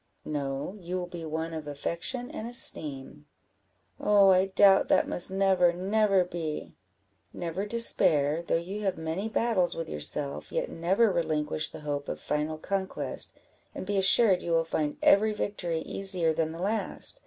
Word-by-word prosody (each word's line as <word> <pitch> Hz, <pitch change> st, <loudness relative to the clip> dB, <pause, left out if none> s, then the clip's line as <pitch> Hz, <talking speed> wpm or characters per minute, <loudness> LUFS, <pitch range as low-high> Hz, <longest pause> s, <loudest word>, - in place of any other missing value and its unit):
"No, 140 Hz, +3 st, -4 dB
you 180 Hz, 0 st, -5 dB
will 180 Hz, -, -3 dB
be 175 Hz, -2 st, -8 dB
one 160 Hz, +1 st, -4 dB
of 155 Hz, -2 st, -6 dB
affection 170 Hz, -, -3 dB
and 220 Hz, -, -6 dB
esteem." 140 Hz, -, 0 dB, 0.7 s
"Oh, 200 Hz, -2 st, +5 dB
I 185 Hz, +1 st, +3 dB
doubt 195 Hz, 0 st, +5 dB
that -, -, +3 dB
must 175 Hz, -, +3 dB
never, 190 Hz, -2 st, +3 dB
never 195 Hz, +1 st, +2 dB
be!" 165 Hz, -3 st, -5 dB, 0.6 s
"Never 175 Hz, +4 st, -4 dB
despair; 170 Hz, -9 st, +3 dB
though 170 Hz, -, -1 dB
you 190 Hz, +5 st, -5 dB
have 195 Hz, -4 st, -1 dB
many 160 Hz, +7 st, -3 dB
battles 220 Hz, -5 st, +1 dB
with 165 Hz, -, -5 dB
yourself, 75 Hz, -, -2 dB
yet -, -, -2 dB
never 190 Hz, +7 st, +2 dB
relinquish 155 Hz, -3 st, -1 dB
the 155 Hz, -, -10 dB
hope 145 Hz, -1 st, -4 dB
of -, -, -4 dB
final 150 Hz, +1 st, -2 dB
conquest, 190 Hz, +4 st, -3 dB, 0.4 s
and -, -, -6 dB
be 205 Hz, +1 st, -2 dB
assured 195 Hz, 0 st, +4 dB
you 170 Hz, -, -2 dB
will 165 Hz, 0 st, +3 dB
find 150 Hz, -2 st, -2 dB
every 215 Hz, +2 st, +5 dB
victory 175 Hz, -6 st, -3 dB
easier 185 Hz, -5 st, -1 dB
than 160 Hz, 0 st, -1 dB
the 165 Hz, +2 st, -6 dB
last. 220 Hz, -, -2 dB
175 Hz, 160 wpm, -28 LUFS, 155-195 Hz, 0.7 s, Oh